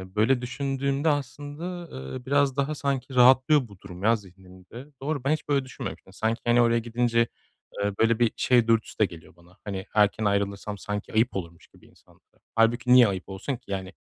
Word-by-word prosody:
böyle 120 +4 +3
düşündüğümde 135 +3 -1
aslında, 145 +5 -4 0.3
eee, 125 -1 -8
biraz 140 -1 +2
daha 140 +2 0
sanki 135 -2 -3
rahatlıyor 130 +2 +5
bu 100 -3 -16
durum 90 -1 -10
ya 115 +2 +4
zihnimde. 95 +3 -13 0.2
Doğru 140 -1 -2
ben 140 - +1
hiç 155 - -4
böyle 140 -2 +1
düşünmemiştim. 130 - -8
Sanki 115 +1 -1
hani 120 0 +4
oraya 115 0 +3
gidince, 115 0 +1 0.6
eee, 100 0 0
böyle 115 0 +3
bir 120 -2 +2
şey 120 -2 +3
dürtüsü 115 -1 +1
de 105 - +5
geliyor 85 -3 -9
bana, 85 +1 -21
hani 95 -2 -5
erken 105 +1 +3
ayrılırsam 100 0 -1
sanki 105 +1 -5
ayıp 115 +1 +2
olurmuş 85 -3 -7
gibi - - -22
insanlara. - - -26 0.2
Hâlbuki 120 +2 +3
niye 125 -3 +8
ayıp 95 -2 -4
olsun 100 +8 -4
ki, 120 -3 -18
yani 95 -1 -4
120 Hz, 185 wpm, -26 LUFS, 100-135 Hz, 0.6 s, niye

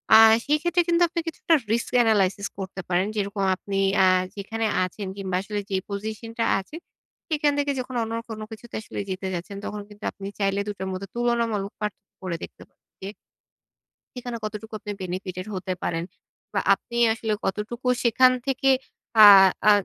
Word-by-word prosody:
আ - - +11 0.3
সেক্ষেত্রে 330 +4 +2
কিন্তু 340 0 +2
আপনি 340 0 -3
কিছুটা 330 +1 0 0.2
risk 235 +1 0
analysis 200 -3 +2
করতে 190 -1 -5
পারেন। 185 +2 +2
যেরকম 200 -1 -2
আপনি 195 +1 -5 0.3
আ - - +6 0.3
যেখানে 225 +3 -3 0.2
আছেন 190 +2 -5
কিংবা 190 -2 -3
আসলে 205 +1 -4
যে 195 - -1
পজিশনটা 220 +3 -4
আছে, 195 +10 -10 0.5
সেখান 300 -2 +2
থেকে 285 0 +1
যখন 255 0 -5
অন্য 225 0 -4 0.2
কোনো 215 -1 -6
কিছুতে 225 +1 -10
আসলে - - -7
যেতে 190 0 -3
যাচ্ছেন, 180 +3 -5
তখন 210 0 -5
কিন্তু 210 0 -15
আপনি 195 - -8
চাইলে 195 0 +1
২ - - -1
টোর 190 - -4
মধ্যে 190 +1 -5
তুলনামূলক 235 -4 0
পার্থক্য 210 -1 -5
করে 180 -2 -2
দেখতে - - -10 0.4
যে 190 - -5 1.1
সেখানে 245 -1 -5
কতটুকু 215 +1 -6
আপনি 210 - -5
benefitted 185 0 -5
হতে 185 0 -3
পারেন 165 0 -1 0.5
বা 200 - +2
আপনি 235 +4 -10 0.2
আসলে 220 -1 -2
কতটুকু 220 +6 -3 0.2
সেখান 255 +2 +5
থেকে 270 0 +2 0.5
আ - - +12 0.4
আ - - +10
210 Hz, 165 wpm, -25 LUFS, 195-235 Hz, 1.1 s, আ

